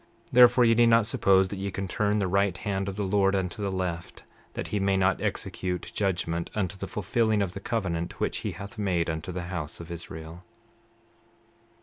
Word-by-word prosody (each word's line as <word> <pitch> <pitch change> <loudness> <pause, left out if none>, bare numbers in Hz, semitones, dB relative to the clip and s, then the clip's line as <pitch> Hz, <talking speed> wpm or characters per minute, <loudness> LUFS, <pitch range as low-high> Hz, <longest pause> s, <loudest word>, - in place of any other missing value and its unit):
29:9 - - -33 0.2
Therefore 125 0 +7
ye 115 - +5
need 120 +1 +5
not 115 -1 +5
suppose 95 -4 +3
that 100 - -5
ye 100 +1 -2
can 95 0 -4
turn 105 +2 0
the 100 -2 +1
right 100 -1 +1
hand 95 -1 -2
of 95 - -6
the 105 - -2
Lord 100 0 +2
unto 95 +1 -2
the 100 - -1
left, 90 -2 -4 0.3
that - - -5
he 105 - -1
may 95 0 +2
not 95 0 +2
execute 90 -1 -3
judgment 85 -4 -1
unto 100 -1 -1
the 95 - -6
fulfilling 110 0 +1
of 90 -2 -4
the 100 - -6
covenant 90 -6 -3
which - - -1
he - - -4
hath 100 +1 -9
made 90 -5 0
unto 80 +3 -5
the 90 0 -4
house 75 -4 -4
of 85 0 -9
Israel. 80 0 -8
95 Hz, 205 wpm, -27 LUFS, 90-105 Hz, 0.3 s, Therefore